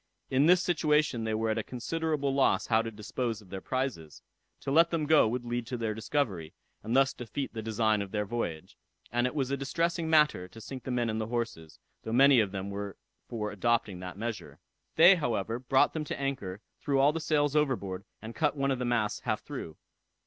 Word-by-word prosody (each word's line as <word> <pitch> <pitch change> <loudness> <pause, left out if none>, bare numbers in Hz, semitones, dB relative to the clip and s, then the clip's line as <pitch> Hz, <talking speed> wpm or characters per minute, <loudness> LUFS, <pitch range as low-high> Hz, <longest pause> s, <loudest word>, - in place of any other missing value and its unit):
In 135 +4 +4
this 180 +1 +5
situation 150 -8 +1
they 110 -1 0
were 110 0 0
at 110 - 0
a - - -2
considerable 145 +3 -2
loss 135 0 +2
how 110 -1 +3
to 115 - -4
dispose 110 +1 -4
of 100 -4 -18
their 95 -1 -5
prizes. 130 - -4 0.4
To 135 - -3
let 165 +3 +5
them 165 -3 -1
go 155 -5 +5
would 120 +2 -3
lead 120 -1 -3
to 125 - -3
their 115 -2 -2
discovery, 105 - -2 0.3
and 115 +3 -2
thus 135 0 +4
defeat 125 +4 -5
the 115 - -4
design 110 -1 +1
of 100 - -5
their 105 +1 -2
voyage; 95 -8 -4 0.3
and 120 +2 +2
it 125 - -6
was 135 -3 -1
a 140 - 0
distressing 165 +4 -1
matter 150 - +3
to 100 +5 -13
sink 125 +3 -8
the - - -4
men 120 -2 0
and 110 0 -1
the 110 - -3
horses, 115 -10 -4 0.2
though 110 - -5
many 135 +1 +6
of 105 -4 +1
them 95 0 -4
were 100 0 -5 0.3
for 105 -3 -3
adopting 105 -3 0
that 90 0 -7
measure. 115 +1 -5 0.4
They, 175 +4 +8
however, 115 - -1
brought 130 +1 +3
them 155 - -2
to - - -5
anchor, 130 -9 -3 0.2
threw 140 -1 +1
all 145 +2 +5
the 165 - -2
sails 150 -2 +1
overboard, 105 -11 0 0.2
and 110 +1 -7
cut 150 +1 0
one 140 0 +1
of 130 - -1
the 125 - -1
masts 115 -4 0
half - - -2
through. 80 - -7
120 Hz, 215 wpm, -29 LUFS, 110-140 Hz, 0.4 s, They